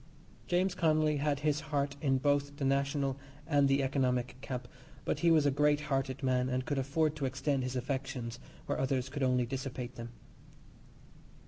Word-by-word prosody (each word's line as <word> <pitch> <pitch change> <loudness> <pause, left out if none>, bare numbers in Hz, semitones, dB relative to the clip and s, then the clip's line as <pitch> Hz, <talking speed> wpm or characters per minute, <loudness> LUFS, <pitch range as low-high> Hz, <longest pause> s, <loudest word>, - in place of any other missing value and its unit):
James 180 +1 +2
Connolly 155 -2 +2
had 145 0 0
his 150 0 +1
heart 145 -2 -1
in 135 -3 +2
both 145 +1 +1
the 140 - -1
national 140 0 +1 0.3
and 145 -3 +3
the 135 0 +3
economic 125 -2 0
camp, 125 -2 -5 0.4
but - - 0
he 170 - +4
was 155 -3 +5
a 145 - +4
great 150 +1 +3
hearted 135 -2 -2
man, 130 -1 +2
and 130 0 -1
could 145 -2 -1
afford 150 +3 +1
to 140 - -1
extend 135 +1 0
his 130 0 -3
affections 130 -2 -3 0.3
where - - -2
others 130 -1 0
could 145 +1 -5
only 125 -1 +2
dissipate 130 -1 -5
them. 115 0 -6
140 Hz, 175 wpm, -32 LUFS, 130-145 Hz, 0.4 s, was